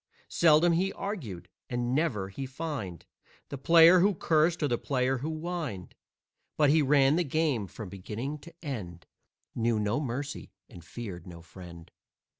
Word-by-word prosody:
Seldom 165 +1 +4
he 185 +4 +1
argued, 140 - -6 0.2
and 120 0 -1
never 120 -11 0
he 135 +7 -6
fined 130 - -6 0.4
The 140 - -6
player 165 +4 +7
who 200 +2 +3
cursed 160 +1 +2
or - - +3
the 120 -3 -1
player 130 -1 0
who 150 +5 -3
whined, 155 - -5 0.6
But 150 -2 +4
he 155 +1 +4
ran 140 +1 +4
the 175 - +2
game 145 - 0
from 100 +2 -9
beginning 115 +10 -6
to 170 +3 -15
end, 90 - -6 0.5
Knew 115 -1 0
no 105 +5 0
mercy 140 -2 -5
and 85 - -13
feared 90 -2 -8
no 85 -2 -11
friend. 85 -1 -12
135 Hz, 155 wpm, -29 LUFS, 105-160 Hz, 0.6 s, player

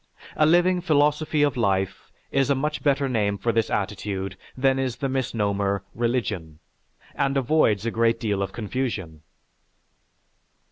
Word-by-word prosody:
A 155 - +4
living 175 +2 +4
philosophy 150 -1 +2
of 145 -3 +2
life 95 -5 -1 0.2
is 135 0 +2
a 140 - +3
much 150 +3 -2
better 140 -1 +2
name 105 -5 0
for 115 - 0
this 115 0 +1
attitude 100 -1 -3 0.2
than 135 0 +2
is 130 -3 -1
the 135 - -2
misnomer 100 -7 -1
"religion," 110 -9 -2 0.6
and 140 -1 0
avoids 125 -6 +2
a 115 - 0
great 115 0 +2
deal 105 -4 -1
of 100 - -2
confusion. 105 - -4
120 Hz, 140 wpm, -24 LUFS, 100-140 Hz, 0.6 s, A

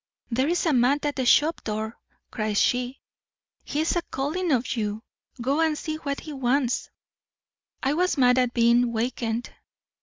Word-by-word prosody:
'There's 280 +10 +1
a 320 - +3
man 255 +3 +4
at 290 -1 -1
the 260 -2 -1
shop 310 +6 +4
door,' 220 +1 -3 0.4
cries 215 -2 -1
she. 250 +2 +1 0.6
'He's 310 +4 -1
a 345 - +1
calling 320 +5 -2
of 255 -1 +1
you; 215 -1 -3 0.4
go 275 +6 +1
and 315 -2 +2
see 310 0 -4
what 280 -2 -4
he 305 - -8
wants.' 265 -1 0 0.9
I 270 +1 +2
was 360 +1 +1
mad 250 -1 +5
at 250 -1 +2
being 235 0 +3
wakened. 230 0 -2
255 Hz, 155 wpm, -25 LUFS, 235-295 Hz, 0.9 s, mad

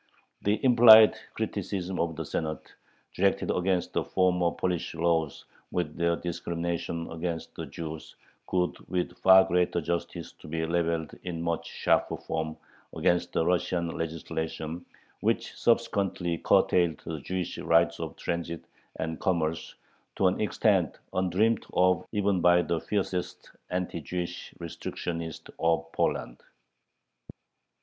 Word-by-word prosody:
The 105 +2 +1
implied 115 -3 +9 0.2
criticism 95 -1 -3
of 85 -1 0
the - - -4
Senate, 80 -1 -4 0.4
directed 100 +1 +1
against 90 0 0
"the - - +1
former 90 -2 +2
Polish 90 -1 -2
laws 80 -2 0 0.2
with 85 -4 -2
their 85 0 +1
discriminations 85 -1 -3
against 85 0 -4
the - - -6
Jews," 80 -1 -7 0.3
could 90 -1 0
with 90 -1 -1
far 95 0 +8
greater 90 -1 +1
justice 85 0 -4
be 80 +1 -4
leveled 85 -1 -1
in 85 -2 -4
much 85 -1 -2
sharper - - +1
form 80 -1 -4 0.4
against 90 0 +1
the 80 - +1
Russian 90 -1 +1
legislation 80 +1 -4 0.3
which - - 0
subsequently 100 -7 +1
curtailed 85 -4 +3
the 80 -2 -4
Jewish 90 +4 -4
right 85 0 +3
of 80 -2 -5
transit 85 -1 -4 0.3
and 80 0 -4
commerce 80 -3 -1 0.4
to 95 - +1
an 90 +2 +2
extent 100 - +2 0.2
undreamt 95 +5 +2
of 90 0 +3
even 100 -3 +1
by 90 0 +5
the 85 -1 -1
fiercest 95 -3 -3 0.2
anti 90 -2 -2
Jewish 90 +4 -5
restrictionists 85 -1 -5
of 80 0 +1
Poland. - - -1
85 Hz, 125 wpm, -28 LUFS, 80-90 Hz, 0.4 s, implied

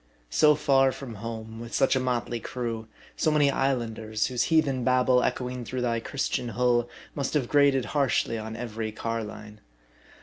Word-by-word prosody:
So 150 -1 +5
far 135 -3 +3
from 130 -3 -8
home, 110 0 -6
with 115 0 -6
such 135 - +3
a - - +2
motley 120 -2 -1
crew, 115 -1 -4 0.3
so - - +1
many 150 -2 +4
islanders, 115 -5 -1
whose 125 -2 0
heathen 145 -6 +2
babhle 125 0 +4
echoing 125 -1 -2
through 125 +2 -4
thy 120 -1 0
.Christian 125 0 -2
hull, 120 -1 +2 0.2
must 140 +1 -2
have 135 -5 +1
grated 140 -3 +4
harshly 135 -5 +1
on 110 0 -6
every 115 -2 -4
carline. 105 -1 -5
125 Hz, 160 wpm, -27 LUFS, 115-135 Hz, 0.3 s, So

